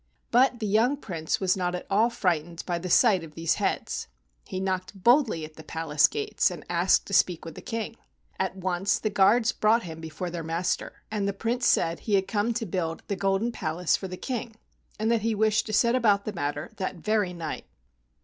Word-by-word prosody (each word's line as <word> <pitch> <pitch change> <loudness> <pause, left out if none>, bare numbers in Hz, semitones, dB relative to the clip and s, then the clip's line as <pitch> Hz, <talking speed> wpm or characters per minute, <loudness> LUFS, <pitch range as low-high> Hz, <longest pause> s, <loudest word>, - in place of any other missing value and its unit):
But 250 0 +4
the 220 - -2
young 225 +7 +2
Prince 170 - -3
was 185 -2 +2
not 180 -1 -1
at 180 - -6
all 215 +4 +3
frightened 170 -6 -1
by 175 -2 -1
the 180 +2 -5
sight 195 -2 +5
of 155 -2 -11
these 165 0 +1
heads. - - -1 0.4
He 185 - -4
knocked 190 0 -3
boldly 240 - +4
at 155 0 -14
the 160 - -10
palace 155 -2 +2
gates 430 0 0
and - - -8
asked - - +3
to - - -8
speak 175 -3 +2
with 165 - -7
the - - -10
King. 225 -2 -4 0.4
At - - -1
once 190 +1 0
the 215 - -2
guards 210 +4 +4
brought 225 +2 +2
him 160 -2 -8
before 160 +2 -5
their 170 -1 -4
master, 165 +3 -2
and 205 -2 -1
the 200 - 0
Prince 235 +5 -1
said 165 0 +2
he 210 - 0
had 190 -1 +1
come 215 +2 0
to 230 -1 -1
build 165 -3 -3
the 200 - 0
golden 195 +4 0
palace 175 -4 0
for 190 - -5
the 185 0 -7
King, 235 -2 -4 0.4
and 220 +2 0
that 230 -2 +2
he 225 +1 0
wished 215 +1 +2
to - - -4
set 235 +3 +3
about 210 -5 +3
the 215 - -3
matter 145 -1 -3
that 185 0 -3
very 210 +1 0
night. 165 -3 -6
195 Hz, 215 wpm, -27 LUFS, 170-220 Hz, 0.4 s, sight